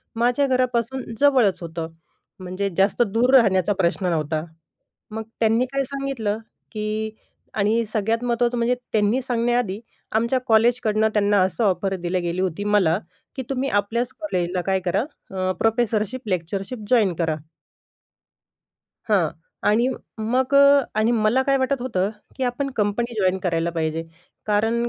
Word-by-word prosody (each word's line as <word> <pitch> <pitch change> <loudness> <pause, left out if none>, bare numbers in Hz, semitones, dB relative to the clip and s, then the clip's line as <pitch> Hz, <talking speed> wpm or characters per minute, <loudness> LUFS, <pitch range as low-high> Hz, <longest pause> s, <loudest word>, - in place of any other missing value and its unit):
माझ्या 245 +4 +2
घरापासून 255 0 0 0.2
जवळच 255 -11 +4
होतं. 165 -1 -5 0.5
म्हणजे 185 +2 -3
जास्त 195 +4 +2
दूर 245 +4 +3
राहण्याचा 200 -5 +4
प्रश्न 185 +1 0
नव्हता. 155 -2 -1 0.7
मग 220 0 -4 0.2
त्यांनी 225 +2 +3
काय 275 0 +1
सांगितलं 270 -6 -2 0.4
की 215 0 -2 0.4
आणि 220 +3 +1
सगळ्यात 225 +2 0
महत्त्वाचं 240 0 +1
म्हणजे 235 +2 +2 0.2
त्यांनी 215 +4 +2
सांगण्याआधी 240 -4 0 0.3
आमच्या 235 +4 +1
कॉलेजकडनं 220 -1 +3
त्यांना 205 -1 +3
असं 190 +5 -1
ऑफर 190 0 +1
दिली 180 +1 -1
गेली 175 +1 -2
होती 190 +1 -2
मला, 200 -4 +3 0.4
की 260 - -4
तुम्ही 270 0 -1
आपल्याच 230 +4 0
कॉलेजला 180 - -1
काय 190 0 +2
करा, 185 +3 +1 0.3
अ, 185 -1 -1
प्रोफेसरशिप, 225 +1 0
लेक्चरशिप 190 +6 -3
जॉइन 220 -7 +4
करा. 160 -2 0 1.7
हां, 185 -7 +3 0.4
आणि 235 +4 +3 0.3
मग 250 +5 0
अ 280 0 +7 0.2
आणि 220 +2 +3
मला 225 +3 +2
काय 275 0 +2
वाटत 260 0 0
होतं 195 -6 0 0.3
की 265 - -1
आपण 265 +3 -2
कंपनी 225 +3 0
जॉइन 185 0 +2
करायला 170 -2 -1
पाहिजे. 165 -1 -2 0.4
कारण 225 +3 +1
220 Hz, 135 wpm, -23 LUFS, 190-245 Hz, 1.7 s, अ